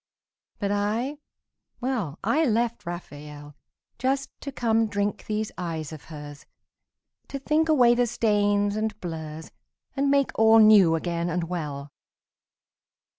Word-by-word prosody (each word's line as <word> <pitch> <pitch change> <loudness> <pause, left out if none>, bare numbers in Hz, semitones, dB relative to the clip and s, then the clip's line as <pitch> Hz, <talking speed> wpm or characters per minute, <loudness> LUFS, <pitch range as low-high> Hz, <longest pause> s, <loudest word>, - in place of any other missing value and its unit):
But 200 -1 -2
I, 220 +8 -1 0.6
well, 235 - -2
I 315 +2 +2
left 235 - 0
Raphael 150 -4 -8 0.4
Just 270 +1 -1
to 280 - -5
come 225 -3 +1
drink 205 0 -2
these 215 0 -2
eyes 160 -3 -4
of 155 - -11
hers, 145 -2 -10 0.8
To 275 - -5
think 305 +4 +1
away 250 -6 +5
the 245 0 +2
stains 205 -3 +1
and 215 -1 -2
blurs 160 -2 -7 0.4
And 280 0 +1
make 280 -1 +2
all 225 0 +7
new 210 -6 +7
again 170 +1 -2
and 175 0 -1
well. 150 -5 -5
205 Hz, 125 wpm, -26 LUFS, 165-240 Hz, 0.8 s, all